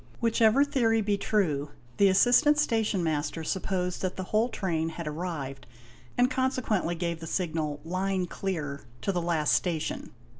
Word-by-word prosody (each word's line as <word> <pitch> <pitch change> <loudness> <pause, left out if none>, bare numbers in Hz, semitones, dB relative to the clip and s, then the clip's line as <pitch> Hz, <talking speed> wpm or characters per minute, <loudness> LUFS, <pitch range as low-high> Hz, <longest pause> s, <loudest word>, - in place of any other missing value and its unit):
Whichever 230 +3 +4
theory 245 -6 +2
be 205 -1 +1
true, 160 -9 0 0.3
the 200 - +6
assistant 245 +10 +5
station 225 -9 +1
master 155 0 -1
supposed 180 +1 -2
that 185 -1 -2
the 185 - -4
whole 215 +6 +1
train 165 -7 -1
had 165 0 -6
arrived 150 -5 -5 0.5
and 245 0 +5
consequently 255 -10 0
gave 170 -1 -2
the 165 - -7
signal 155 -4 -2
"'line 185 +2 -1
clear,'' 155 -7 -4 0.2
to - - +1
the 180 -2 -1
last 165 -3 +1
station. 165 -4 -1
185 Hz, 150 wpm, -28 LUFS, 160-220 Hz, 0.5 s, the